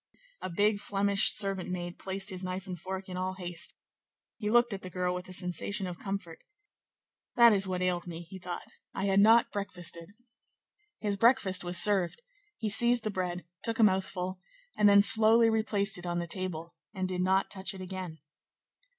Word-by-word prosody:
A -, -, -4 dB
big 205 Hz, +4 st, +1 dB
Flemish 200 Hz, 0 st, +3 dB
servant 195 Hz, -3 st, 0 dB
maid 175 Hz, -1 st, -5 dB
placed 195 Hz, +1 st, -3 dB
his 185 Hz, 0 st, -6 dB
knife 185 Hz, +1 st, -4 dB
and 185 Hz, -2 st, -6 dB
fork 190 Hz, +1 st, -6 dB
in 180 Hz, -1 st, -6 dB
all 185 Hz, +1 st, -3 dB
haste; 175 Hz, -2 st, -3 dB, 0.6 s
he 210 Hz, -, -2 dB
looked 240 Hz, 0 st, +3 dB
at 195 Hz, -, -6 dB
the 185 Hz, -, -8 dB
girl 180 Hz, 0 st, -2 dB
with 180 Hz, +1 st, -7 dB
a -, -, -8 dB
sensation 185 Hz, +2 st, -2 dB
of 180 Hz, -1 st, -7 dB
comfort. 195 Hz, -5 st, -6 dB, 1.0 s
"That 235 Hz, -2 st, +7 dB
is 195 Hz, -1 st, +3 dB
what 185 Hz, -1 st, -2 dB
ailed 180 Hz, -1 st, -1 dB
me," 170 Hz, 0 st, -7 dB
he 190 Hz, +3 st, -11 dB
thought; 175 Hz, 0 st, -6 dB, 0.3 s
"I 195 Hz, -, -2 dB
had 195 Hz, 0 st, +3 dB
not 225 Hz, +3 st, +5 dB
breakfasted." 175 Hz, -4 st, -4 dB, 0.9 s
His 205 Hz, -2 st, -1 dB
breakfast 200 Hz, -5 st, +3 dB
was 175 Hz, 0 st, +1 dB
served; 195 Hz, -, +3 dB, 0.4 s
he 220 Hz, -, -3 dB
seized 240 Hz, +3 st, +3 dB
the 215 Hz, -, -2 dB
bread, 180 Hz, -2 st, -4 dB, 0.2 s
took 230 Hz, 0 st, -2 dB
a 230 Hz, -, +4 dB
mouthful, 190 Hz, -2 st, 0 dB, 0.4 s
and 210 Hz, -, +5 dB
then 200 Hz, 0 st, +6 dB
slowly 225 Hz, +1 st, +5 dB
replaced 215 Hz, -3 st, 0 dB
it 175 Hz, -, -8 dB
on 175 Hz, 0 st, -2 dB
the 170 Hz, -, -2 dB
table, 170 Hz, -2 st, -5 dB, 0.2 s
and 185 Hz, -1 st, -2 dB
did 180 Hz, -1 st, -3 dB
not 190 Hz, +1 st, +1 dB
touch 190 Hz, 0 st, -5 dB
it 190 Hz, -, -9 dB
again. 185 Hz, -3 st, -7 dB
190 Hz, 185 wpm, -29 LUFS, 180-205 Hz, 1.0 s, That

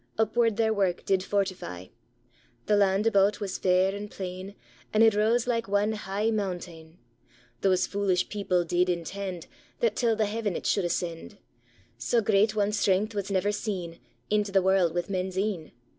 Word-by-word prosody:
Upward 225 Hz, 0 st, +2 dB
their 220 Hz, -1 st, +2 dB
wark 195 Hz, -4 st, 0 dB
did 190 Hz, -1 st, +2 dB
fortify; 185 Hz, -, -3 dB, 0.8 s
The 210 Hz, -, +3 dB
land 200 Hz, 0 st, +2 dB
about 205 Hz, -2 st, +3 dB
was 200 Hz, -3 st, -4 dB
fair 185 Hz, +1 st, +3 dB
and 205 Hz, +1 st, -6 dB
plain, 190 Hz, +1 st, -7 dB, 0.4 s
And 215 Hz, +1 st, +4 dB
it 225 Hz, -1 st, +6 dB
rase 225 Hz, +3 st, +2 dB
like 230 Hz, -4 st, -1 dB
ane 205 Hz, +2 st, +1 dB
heich 210 Hz, +1 st, -1 dB
montane, 175 Hz, -5 st, -5 dB, 0.6 s
Those 190 Hz, -2 st, +3 dB
fulish 195 Hz, -3 st, 0 dB
people 190 Hz, -4 st, 0 dB
did 175 Hz, +2 st, +1 dB
intend, 180 Hz, +1 st, -4 dB, 0.3 s
That 475 Hz, -, +1 dB
till 230 Hz, -3 st, +2 dB
the 215 Hz, 0 st, +1 dB
heaven 210 Hz, -2 st, -2 dB
it -, -, -5 dB
should 200 Hz, -, +1 dB
ascend; 175 Hz, +3 st, -3 dB, 0.6 s
Sae 230 Hz, -, +1 dB
great 215 Hz, +1 st, +2 dB
ane 205 Hz, 0 st, +2 dB
strength 205 Hz, +1 st, +1 dB
was 200 Hz, -1 st, -3 dB
never 195 Hz, +1 st, +1 dB
seen 185 Hz, -6 st, -4 dB, 0.3 s
Into 210 Hz, -1 st, +1 dB
the 195 Hz, -1 st, +3 dB
warld 185 Hz, -3 st, +2 dB
with 175 Hz, 0 st, -1 dB
men's 185 Hz, -1 st, -3 dB
een. 190 Hz, -5 st, -2 dB
200 Hz, 165 wpm, -27 LUFS, 185-210 Hz, 0.8 s, it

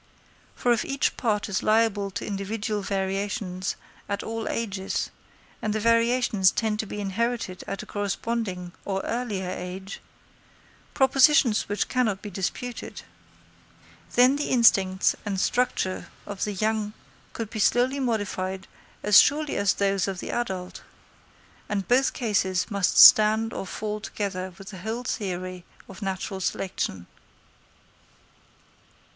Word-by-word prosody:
For 245 Hz, -, +2 dB
if 230 Hz, -, 0 dB
each 275 Hz, 0 st, 0 dB
part 210 Hz, -4 st, 0 dB
is 200 Hz, -3 st, -1 dB
liable 215 Hz, -2 st, +2 dB
to 190 Hz, -, -5 dB
individual 205 Hz, +1 st, -3 dB
variations 195 Hz, -1 st, -2 dB, 0.3 s
at 200 Hz, 0 st, -2 dB
all 225 Hz, 0 st, -4 dB
ages, 200 Hz, -4 st, -2 dB, 0.5 s
and 215 Hz, -, -1 dB
the 215 Hz, -, -1 dB
variations 230 Hz, -3 st, +3 dB
tend 215 Hz, 0 st, -1 dB
to 215 Hz, -, -2 dB
be 210 Hz, -, -6 dB
inherited 205 Hz, -1 st, -2 dB
at 195 Hz, -, -4 dB
a -, -, -10 dB
corresponding 205 Hz, -2 st, -3 dB
or 195 Hz, -1 st, -2 dB
earlier 220 Hz, -6 st, -2 dB
age—propositions 210 Hz, -, 0 dB
which 205 Hz, -, 0 dB
cannot 225 Hz, -7 st, 0 dB
be 210 Hz, -, -6 dB
disputed—then 245 Hz, +5 st, -3 dB
the 290 Hz, -, -2 dB
instincts 195 Hz, -6 st, +4 dB
and 200 Hz, -3 st, -2 dB
structure 245 Hz, -5 st, 0 dB, 0.2 s
of 200 Hz, -2 st, -3 dB
the 210 Hz, -, -3 dB
young 215 Hz, +1 st, -1 dB, 0.4 s
could 225 Hz, -2 st, -5 dB
be 225 Hz, -, -5 dB
slowly 245 Hz, +6 st, +2 dB
modified 190 Hz, -6 st, -2 dB, 0.4 s
as 210 Hz, -2 st, +8 dB
surely 300 Hz, +1 st, +2 dB
as 200 Hz, 0 st, +2 dB
those 195 Hz, -1 st, +1 dB
of 190 Hz, -2 st, -3 dB
the -, -, -5 dB
adult; 190 Hz, -7 st, -3 dB, 0.9 s
and 200 Hz, -2 st, -2 dB
both 260 Hz, +2 st, +3 dB
cases 195 Hz, -4 st, 0 dB
must 200 Hz, -2 st, +1 dB
stand 220 Hz, +1 st, +8 dB
or 195 Hz, -, -5 dB
fall 210 Hz, +2 st, -4 dB
together 195 Hz, -3 st, -4 dB
with 195 Hz, 0 st, -10 dB
the 190 Hz, -, -9 dB
whole 225 Hz, +5 st, -4 dB
theory 185 Hz, -5 st, -4 dB, 0.2 s
of 195 Hz, -, -12 dB
natural 190 Hz, 0 st, -3 dB
selection. 140 Hz, -, -3 dB
205 Hz, 130 wpm, -26 LUFS, 190-230 Hz, 0.9 s, as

